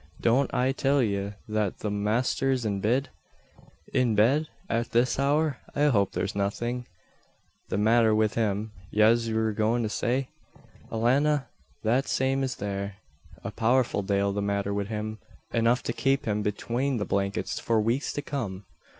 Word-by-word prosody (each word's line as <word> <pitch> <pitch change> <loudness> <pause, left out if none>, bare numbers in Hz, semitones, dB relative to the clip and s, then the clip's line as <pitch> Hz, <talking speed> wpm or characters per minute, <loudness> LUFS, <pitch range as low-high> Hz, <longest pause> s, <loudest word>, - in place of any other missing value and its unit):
Don't 125 +4 +2
I 125 +1 +2
till 135 0 +2
ye 100 -2 -1
that 105 -3 -1
the 105 - -3
masther's 120 +5 0
in 100 -2 -1
bid?" 125 +7 +1 0.8
"In 120 -4 +2
bed! 135 +9 +3 0.2
At 115 +1 -1
this 120 +3 +2
hour? 145 0 +1 0.2
I 145 - +2
hope 100 -7 +2
there's 100 - -2
nothing 120 +5 -2 0.4
" - - -40
"The - - -1
matther 110 +1 +4
wid 110 -1 +2
him, 110 -1 -1 0.2
yez 115 +2 +3
wur 110 0 +1
goin' 110 +3 +1
to 110 - -1
say? 125 +4 -1 0.6
Alannah, 135 +5 +2 0.3
that 125 +5 +2
same 135 +1 +1
is 130 -2 -1
there 100 0 -4 0.5
a - - -4
powerful 120 -1 +2
dale 100 0 0
the 100 - -1
matther 100 0 -1
wid 100 -1 -2
him 110 0 -4 0.3
enough 115 +2 +2
to - - -2
kape 135 0 +1
him 105 -2 0
betwane 120 +6 -1
the 105 - -2
blankets 100 +1 -1
for 115 -1 +1
weeks 115 +6 0
to 145 - -3
come." 105 -9 -4
115 Hz, 160 wpm, -27 LUFS, 105-130 Hz, 0.8 s, matther